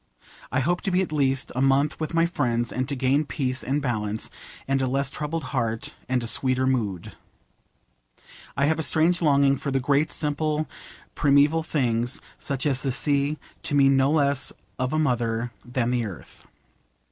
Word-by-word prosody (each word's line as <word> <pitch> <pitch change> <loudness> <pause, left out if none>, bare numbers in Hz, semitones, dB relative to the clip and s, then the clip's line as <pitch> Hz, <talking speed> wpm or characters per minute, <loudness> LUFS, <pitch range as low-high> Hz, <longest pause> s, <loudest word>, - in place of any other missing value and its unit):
I 130 - +1
hope 175 +6 0
to 195 - -1
be 185 0 +2
at 175 - -6
least 135 -3 0
a 130 - 0
month 135 +2 +2
with 160 +1 -3
my 165 0 +4
friends, 120 -8 0
and 130 +1 -2
to 140 - -1
gain 135 +3 +2
peace 130 -4 -2
and 140 +3 -1
balance, 110 -4 -2 0.4
and 135 0 +1
a 130 - +1
less 135 +1 0
troubled 155 +1 -3
heart, 115 -3 -2 0.2
and 125 -2 +1
a - - -3
sweeter 130 +2 +2
mood. 110 -9 -1 1.5
I 140 - +3
have 160 +2 +1
a - - +1
strange 165 +3 +2
longing 140 -3 +4
for 140 - -4
the 135 0 +1
great 140 +4 +1
simple 150 0 -1 0.5
primeval 145 +3 +4
things, 125 -6 0 0.2
such 135 -1 -3
as 135 -3 +2
the 135 - 0
sea, 140 +4 +1 0.2
to 145 - -2
me 140 -1 +6
no 135 0 +4
less 140 -3 +1 0.3
of 130 0 0
a 155 - 0
mother 120 -5 0
than 120 -1 -1
the 120 -3 0
Earth. 95 - -11
135 Hz, 180 wpm, -25 LUFS, 125-150 Hz, 1.5 s, me